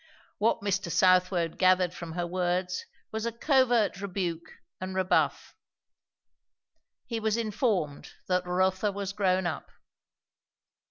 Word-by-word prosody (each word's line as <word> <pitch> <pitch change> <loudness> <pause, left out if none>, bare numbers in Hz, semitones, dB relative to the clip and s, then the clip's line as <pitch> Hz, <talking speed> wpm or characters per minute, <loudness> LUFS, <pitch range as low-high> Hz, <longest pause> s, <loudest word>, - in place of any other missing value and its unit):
What 215 0 +2
Mr. 195 -3 -1
Southwode 180 -1 +3
gathered 185 -1 +4
from 170 -2 -7
her 175 0 -2
words 180 +1 -1 0.2
was 220 +1 -2
a - - -1
covert 240 -5 +2
rebuke 180 -4 -4 0.3
and 185 0 -5
rebuff. 190 0 +1 1.5
He 230 -2 -3
was 220 0 0
informed 210 - -1 0.2
that 180 -1 0
Rotha 185 +3 +1
was 200 0 -4
grown 190 -2 +1
up. 160 -5 -4
185 Hz, 115 wpm, -28 LUFS, 180-205 Hz, 1.5 s, gathered